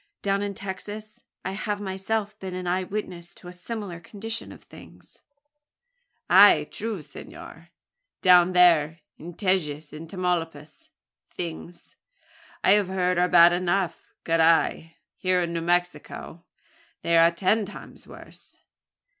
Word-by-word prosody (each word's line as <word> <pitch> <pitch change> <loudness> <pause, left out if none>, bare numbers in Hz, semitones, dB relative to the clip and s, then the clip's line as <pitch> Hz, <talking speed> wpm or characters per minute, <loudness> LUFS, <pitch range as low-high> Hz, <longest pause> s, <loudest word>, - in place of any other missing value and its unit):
Down 200 0 0
in 200 -1 -3
Texas, 210 +1 -8 0.3
I 190 - -2
have 205 +1 -3
myself 205 +2 -3
been 190 -2 -6
an 185 0 -5
eye 180 +1 0
witness 180 -3 -6
to 175 - -13
a 180 - -9
similar 185 -1 -7
condition 220 +6 -6
of - - -14
things." - - -16 1.1
"Ah! 185 -4 +7
true, 215 -6 -4
senor. 165 +3 -12 0.5
Down 180 0 +6
there 165 -3 +4 0.2
in 170 +1 -9
Tejas 155 -7 -1
and 160 +1 -9
Tamaulipas 170 - -4 0.4
things, 170 0 -8 0.7
I - - +5
have 205 -1 +4
heard, 180 -1 0
are 180 0 +2
bad 175 -1 +7
enough. 180 +1 -1
Carrai! 165 0 +2 0.2
here 185 -1 +1
in 170 0 -4
New 165 - -2
Mexico 175 -1 -3 0.6
they 170 - +1
are 165 0 +6
ten 195 +5 0
times - - -12
worse. - - -14
180 Hz, 130 wpm, -25 LUFS, 170-195 Hz, 1.1 s, Ah